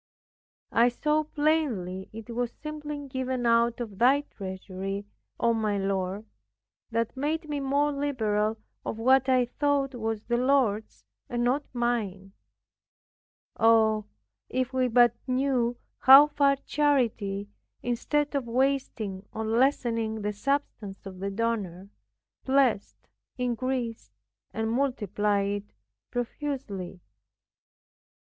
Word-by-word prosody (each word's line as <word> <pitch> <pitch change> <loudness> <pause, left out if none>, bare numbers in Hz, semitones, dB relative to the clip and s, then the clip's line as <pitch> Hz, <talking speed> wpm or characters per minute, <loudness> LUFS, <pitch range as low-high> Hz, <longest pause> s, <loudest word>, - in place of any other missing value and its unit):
I 235 +2 +5
saw 300 +5 0
plainly 275 - 0
it 225 +1 -9
was 240 0 -2
simply 295 -2 -6
given 260 -2 -2
out 235 0 +3
of 210 -5 -6
Thy 265 +4 +5
treasury, 195 -3 -6 0.3
O 235 -1 +3
my 215 -2 0
Lord, 195 +1 -2 0.6
that 230 0 -1
made 305 +4 -2
me 295 -1 -2
more 280 +2 +1
liberal 225 -7 0 0.3
of - - -4
what 260 +3 +4
I 255 -1 +4
thought 280 +1 0
was 225 -3 -3
the 240 0 0
Lord's, 245 -5 +1 0.3
and 240 -1 -1
not 265 +4 +1
mine. 215 -6 -2 1.3
Oh, 220 -2 +4 0.4
if 255 0 -1
we 255 -1 +2
but 240 -1 +5
knew 255 -2 +1 0.2
how 270 +3 +10
far 280 -2 +2
charity, 225 -9 +1 0.3
instead 290 +5 0
of 275 -4 -1
wasting 230 -6 -1
or 220 0 -4
lessening 230 -2 +1
the 210 0 -1
substance 210 -5 -3
of 190 -1 -8
the 195 +1 -2
donor, 200 -4 -2 0.5
blessed, 260 -6 +1 0.3
increased 250 -1 -2 0.4
and 220 0 -2
multiplied 205 -5 0
it - - -37 0.4
profusely. 240 - -4
240 Hz, 110 wpm, -27 LUFS, 210-270 Hz, 1.3 s, how